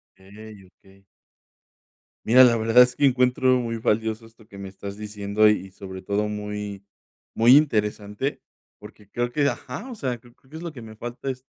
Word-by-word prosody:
Okey, 100 Hz, +1 st, -14 dB
okey. 95 Hz, +1 st, -24 dB, 1.2 s
Mira, 125 Hz, +3 st, +7 dB
la 120 Hz, -2 st, +6 dB
verdad 115 Hz, +2 st, +5 dB
es 125 Hz, 0 st, -6 dB
que 145 Hz, -, 0 dB
encuentro 125 Hz, -1 st, +3 dB
muy 115 Hz, -1 st, -3 dB
valioso 110 Hz, 0 st, -1 dB
esto 115 Hz, -1 st, -19 dB
que 100 Hz, -, -13 dB
me 100 Hz, -1 st, -8 dB
estás 100 Hz, +1 st, -8 dB
diciendo. 105 Hz, 0 st, 0 dB
Y, 105 Hz, -2 st, +1 dB
sobre 95 Hz, -1 st, -9 dB
todo, 100 Hz, +3 st, -1 dB
muy, 105 Hz, -1 st, -5 dB, 0.5 s
muy 120 Hz, +3 st, +6 dB
interesante. 105 Hz, -2 st, 0 dB, 0.4 s
Porque 105 Hz, -1 st, -15 dB
creo 120 Hz, 0 st, -2 dB
que, 145 Hz, +3 st, +1 dB
ajá, 140 Hz, -, -5 dB
o -, -, -6 dB
sea, 130 Hz, -, -3 dB
creo 120 Hz, +1 st, -21 dB
que 135 Hz, +4 st, -15 dB
es 160 Hz, -, -8 dB
lo 170 Hz, -2 st, -6 dB
que 130 Hz, -, -10 dB
me 110 Hz, -1 st, -11 dB
falta 120 Hz, +4 st, -7 dB
es 130 Hz, -1 st, -5 dB
110 Hz, 180 wpm, -24 LUFS, 105-125 Hz, 1.2 s, Mira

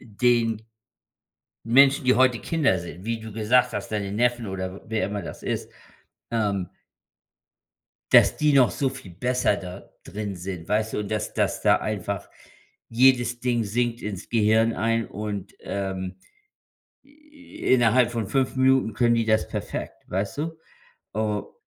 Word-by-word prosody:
den 115 Hz, -1 st, +1 dB, 1.0 s
Menschen, 135 Hz, +4 st, +5 dB
die 130 Hz, 0 st, +5 dB
heute 130 Hz, -1 st, +4 dB
Kinder 150 Hz, -, +1 dB
sind, 85 Hz, +2 st, -9 dB
wie 115 Hz, 0 st, -2 dB
du 110 Hz, -1 st, -9 dB
gesagt 120 Hz, +4 st, +2 dB
hast, 105 Hz, -2 st, -5 dB
deine 100 Hz, -2 st, -2 dB
Neffen 120 Hz, +1 st, +1 dB
oder 95 Hz, -1 st, -4 dB
w -, -, -12 dB
wer 110 Hz, -2 st, -1 dB
immer 100 Hz, 0 st, -4 dB
das -, -, -9 dB
ist, -, -, -3 dB, 0.6 s
ähm 100 Hz, -6 st, -1 dB, 1.4 s
Das -, -, +6 dB
die 150 Hz, -1 st, +2 dB
noch 135 Hz, -3 st, +5 dB
so 135 Hz, -, 0 dB
viel 130 Hz, -9 st, -10 dB
besser 125 Hz, +2 st, +1 dB
da 90 Hz, -1 st, -9 dB
drin 105 Hz, -2 st, -5 dB
sind, 90 Hz, -2 st, -7 dB
weißt 110 Hz, +1 st, 0 dB
du? -, -, -2 dB
Und 105 Hz, -, -5 dB
dass 105 Hz, -1 st, -3 dB
dass -, -, 0 dB
da -, -, +5 dB
einfach 100 Hz, -2 st, -4 dB, 0.6 s
jedes 120 Hz, 0 st, +3 dB
Ding 120 Hz, -2 st, 0 dB
sinkt 120 Hz, +3 st, -1 dB
ins 100 Hz, -4 st, -6 dB
Gehirn 110 Hz, 0 st, +3 dB
ein 115 Hz, +1 st, 0 dB
und, 105 Hz, -1 st, -5 dB
ähm. 95 Hz, -2 st, -4 dB, 0.9 s
I 290 Hz, 0 st, -7 dB
innerhalb 120 Hz, 0 st, +4 dB
von 115 Hz, -4 st, -3 dB
5 130 Hz, +3 st, 0 dB
Minuten 130 Hz, -3 st, +3 dB
können 120 Hz, +1 st, +3 dB
die 115 Hz, -1 st, +1 dB
das 110 Hz, 0 st, +2 dB
perfekt, -, -, -6 dB
weißt 100 Hz, +6 st, -3 dB
du? 160 Hz, +1 st, -4 dB, 0.5 s
O 105 Hz, -1 st, -2 dB
110 Hz, 150 wpm, -25 LUFS, 100-125 Hz, 1.4 s, Das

